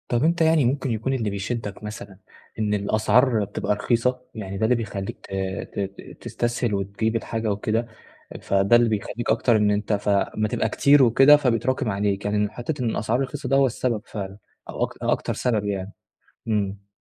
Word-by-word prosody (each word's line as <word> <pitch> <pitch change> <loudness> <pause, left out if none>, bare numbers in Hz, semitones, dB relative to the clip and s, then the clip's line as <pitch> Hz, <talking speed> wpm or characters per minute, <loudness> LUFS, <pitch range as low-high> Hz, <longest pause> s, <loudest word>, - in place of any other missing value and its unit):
طب 120 +1 +1
أنت 170 +2 +2
يعني 160 -3 +4
ممكن 130 +1 0
يكون 115 +4 -1
اللي 115 -5 -1
بيشدك 100 +1 -4
مثلًا 105 -2 -8 0.4
إن 105 -1 0
الأسعار 110 +3 +2
بتبقى 105 +1 -2
رخيصة؟ 125 +4 0
يعني 100 -3 -5
ده 95 - -2
اللي 125 +3 +3
بيخلّيك 100 -4 -4
ت - - -15 0.4
ت - - -3
ت 100 0 -6
تستسهل 120 -1 -2
وتجيب 100 +3 -1
الحاجة 115 -1 -2
وكده، 110 +3 -1 0.5
فده 100 +3 +3
اللي 120 -1 +4
بيخلّيك 110 +2 -3
أكتر 115 +1 +3
إن 105 -1 +3
أنت 105 +1 0
فأما 100 +1 0
تبقى 110 +1 -1
كتير 140 +4 +5
وكده 135 +5 +7
فبيتراكم 130 -3 0
عليك، 100 0 -1
يعني 105 0 0
إن 105 0 0
حتّة 130 +5 -4
إن 120 - 0
الأسعار 110 +3 0
رخيصة 135 +2 -3
ده 135 - +3
هو 135 0 +5
السبب 120 -3 -1
فعلًا 95 -2 -6 0.3
أو - - -2
أك - - 0
أكتر - - 0
سبب 110 -4 0
يعني؟ 100 -1 -3 0.6
إمم. 100 -2 -2
110 Hz, 180 wpm, -24 LUFS, 100-120 Hz, 0.6 s, وكده